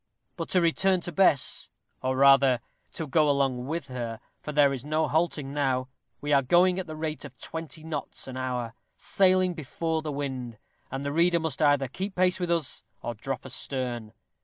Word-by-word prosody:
But - - -5
to 180 - +3
return 185 +3 +3
to 175 - -5
Bess, 160 -6 +3 0.3
or 130 0 -1
rather 135 -2 +6 0.3
to 160 - -3
go 150 +1 +3
along 135 -3 +1
with 160 0 -3
her, 120 -4 -5 0.2
for 150 - -5
there 145 -2 +4
is 130 -2 -5
no 155 +1 0
halting 155 -4 0
now; 130 -3 0 0.3
we 145 0 0
are 140 - +6
going 180 +7 +4
at 185 - -4
the 155 - -6
rate 155 0 -3
of 135 -3 -10
twenty 160 -1 -6
knots 155 -4 -5
an 130 - -7
hour 125 -3 -3 0.2
sailing 185 -1 +3
before 160 +1 -2
the 155 -1 -4
wind; 130 -5 -4 0.3
and 135 +1 -4
the 140 - -2
reader 170 +2 +4
must 160 -4 -3
either 145 -2 +4
keep 190 - -5
pace 185 +1 +2
with 175 -1 -2
us, 165 -5 0 0.2
or 120 - -3
drop 130 +4 -5
astern. 125 -4 -3
145 Hz, 185 wpm, -27 LUFS, 130-165 Hz, 0.3 s, rather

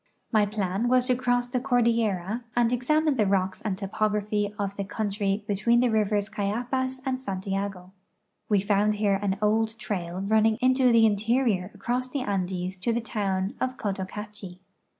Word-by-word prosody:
My 215 -3 +3
plan 200 +1 -1
was 250 0 +4
to 250 -1 +2
cross 245 -1 +1
the 245 +1 -2
cordillera 230 -4 +1
and 240 0 +3
examine 300 +4 +2
the 210 -3 +3
rocks 190 -1 0
and 200 -4 -2
topography 210 +1 -1
of 200 -1 -3
the 200 - -3
country 200 0 -2
between 215 +3 +2
tlie 245 -2 +2
rivers 210 -1 +1
Cayapas 245 +5 -2
and 260 -1 -1
Santiago. 195 -3 -4 0.6
We 205 -3 +3
found 205 +1 +2
here 205 -2 +1
an 195 -1 0
old 220 +1 +1
trail 185 -5 -4
running 220 +2 +3
into 255 -1 +4
the 230 -1 +6
interior 215 -2 +1
across 245 +5 -2
the 265 +1 -3
Andes 185 -4 -2
to 210 +6 -1
the 235 - +1
town 200 -4 -2
of 255 0 -1
Cotocachi. 200 -1 -5
210 Hz, 160 wpm, -26 LUFS, 195-240 Hz, 0.6 s, the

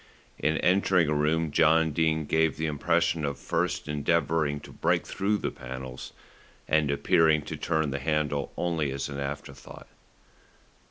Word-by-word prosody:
In 80 +1 +1
entering 90 -2 +3
a - - +1
room 75 +2 +1
John 80 +1 +4
Dene 80 0 +1
gave 80 0 +1
the 80 - -2
impression 80 +2 0
of 70 -1 -2
first 90 0 -2
endeavouring 75 0 0
to - - -12
break - - 0
through 100 +2 -1
the - - -3
panels, 65 0 -8 0.6
and 75 -2 +2
appearing 75 +2 +3
to - - -6
turn 80 -3 -1
the 70 - -3
handle 75 0 -1
only 80 -4 -1
as 70 +1 -4
an 70 -1 -5
afterthought. 70 -1 -7
75 Hz, 150 wpm, -27 LUFS, 70-80 Hz, 0.6 s, John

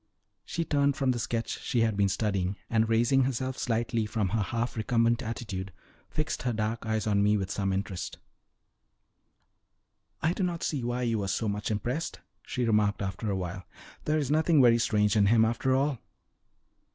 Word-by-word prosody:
She 170 - -2
turned 140 -2 +2
from 135 -2 +2
the 120 - -2
sketch 115 0 -2
she 120 - 0
had 110 -2 +2
been 100 -1 +2
studying, 95 -1 -1 0.2
and 110 -1 +2
raising 120 +4 +3
herself 130 0 -2
slightly 115 -2 -1
from 105 -3 -1
her 110 +2 0
half 115 +4 -2
recumbent 115 +1 +2
attitude, 105 -5 -5 0.4
fixed 155 - -2
her 125 -1 -1
dark 110 +1 -2
eyes 110 -1 0
on 100 -2 +2
me 105 +1 +3
with 95 -1 -3
some 95 -1 -1
interest. 95 -1 -3 2.0
"I 165 +2 +1
do 195 - -4
not 175 -2 -1
see 140 -5 -1
why 120 +1 -1
you 115 -2 0
were 100 - -2
so 105 +3 -1
much 105 0 -2
impressed," 120 +9 -2 0.3
she 125 -2 -1
remarked 105 -2 +2
after 95 +3 -3
a 100 - 0
while. 95 +1 -4 0.4
"There 155 +1 +2
is 145 -3 -1
nothing 160 0 +4
very 120 -2 +6
strange 105 -2 +2
in 100 -2 +4
him 110 +1 +5
after 120 +3 +1
all." 135 -1 +1
115 Hz, 180 wpm, -29 LUFS, 105-125 Hz, 2.0 s, very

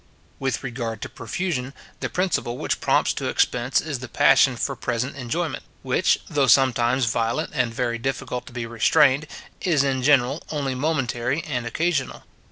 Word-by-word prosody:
With 130 -3 -2
regard 120 -4 -4
to - - -5
profusion, 135 - -4 0.2
the - - -3
principle 180 -10 -1
which - - -2
prompts - - +2
to - - -3
expense 125 +2 +1
is 150 -5 -4
the 130 - -7
passion 125 +2 +4
for 135 +3 -2
present 125 +3 -2
enjoyment; 150 +6 -3 0.2
which, - - +2
though 140 -2 +1
sometimes 125 0 +4
violent 115 +1 -1
and 115 - 0
very 115 0 -2
difficult 125 -1 -3
to - - -10
be 120 -1 -4
restrained, 130 +5 +3 0.3
is 155 -7 +2
in 135 -2 0
general 135 +1 +3
only 140 -4 -2
momentary 130 -1 -1
and 125 -6 -3
occasional. 155 +1 -1
130 Hz, 160 wpm, -23 LUFS, 120-145 Hz, 0.3 s, passion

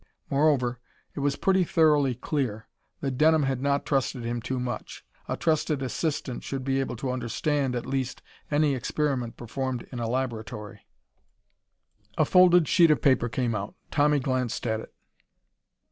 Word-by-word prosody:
Moreover, 135 -4 +2 0.3
it - - -6
was 140 0 +1
pretty 190 -1 +2
thoroughly 150 -6 +3
clear 125 -4 -3 0.3
that 135 -3 -3
Denham 155 0 +5
had 135 -2 -1
not 140 0 +1
trusted 135 -3 0
him 120 0 -2
too 130 +2 -3
much. 125 0 -5 0.2
A - - -2
trusted 155 -4 0
assistant 135 -1 -2
should 135 -1 -4
be 135 0 0
able 130 -2 -2
to 130 +2 -3
understand, 130 +2 -1
at 120 - -3
least, 135 -1 -3 0.3
any 150 -1 +2
experiment 130 -1 -2
performed 125 +1 -4
in 125 - -5
a 115 -1 -2
laboratory. 110 -5 -4 1.3
A - - +4
folded 180 -3 +6
sheet 170 +1 +5
of 150 -4 +4
paper 130 -2 +3
came 120 -1 -1
out. 100 -1 -4 0.2
Tommy 150 0 +3
glanced 130 -3 -2
at 110 -2 0
it. - - -10
135 Hz, 155 wpm, -27 LUFS, 120-145 Hz, 1.3 s, folded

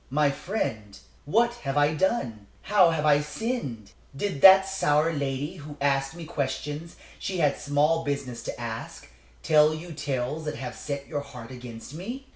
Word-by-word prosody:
"My 145 +1 +3
friend, 115 - -4 0.3
what 235 +10 +3
have 135 0 -2
I 145 +1 +4
done? 125 - -1 0.2
How 195 -4 +5
have 160 -2 0
I 145 -1 +5
sinned? 150 - -4 0.2
Did 145 -2 -3
that 190 0 +9
sour 165 -4 +2
lady, 140 +1 -3
who 145 0 -9
asked 135 +1 +1
me 170 -1 -8
questions 150 +2 -4 0.2
she 190 - -3
had 150 -4 +2
small 150 +3 +2
business 140 -4 -3
to - - -5
ask, 115 - -6 0.3
tell 155 0 +5
you 165 +2 -8
tales 145 +1 -3
that 150 - -3
have 125 -2 -6
set 140 -1 -5
your 145 -1 -3
heart 125 -3 -10
against 125 0 -9
me? 235 - -6
145 Hz, 165 wpm, -27 LUFS, 135-165 Hz, 0.3 s, that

